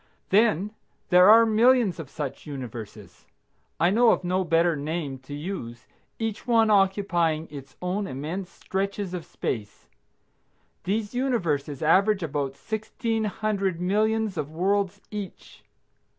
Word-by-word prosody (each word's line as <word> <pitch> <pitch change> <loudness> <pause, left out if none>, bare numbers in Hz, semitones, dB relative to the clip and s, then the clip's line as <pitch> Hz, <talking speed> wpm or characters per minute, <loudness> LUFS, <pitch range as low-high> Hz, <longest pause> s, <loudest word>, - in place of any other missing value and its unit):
Then 210 -1 +3 0.4
there 180 +1 +7
are 230 +1 +8
millions 225 -3 +3
of 155 -5 -7
such 145 -1 -6
universes, 120 -6 -8 0.5
(I 175 +2 +4
know 235 +3 +5
of - - +2
no 185 +1 0
better 165 0 +2
name 145 -2 -4
to 130 +2 -11
use) 145 -8 -6 0.3
each 225 0 -4
one 225 -2 +4
occupying 190 -5 +2
its 135 -3 -10
own 195 +3 -1
immense 165 +8 -5
stretches 195 0 -3
of 175 -3 -5
space. 110 -10 -5 1.0
These 205 +3 -1
universes 170 - -1
average 190 +4 +3
about 140 -3 -2
sixteen 220 +2 -3
hundred 200 -4 -1
millions 215 +2 +1
of 145 - -3
worlds 190 +4 0
each. 205 -4 -8
185 Hz, 125 wpm, -26 LUFS, 155-210 Hz, 1.0 s, are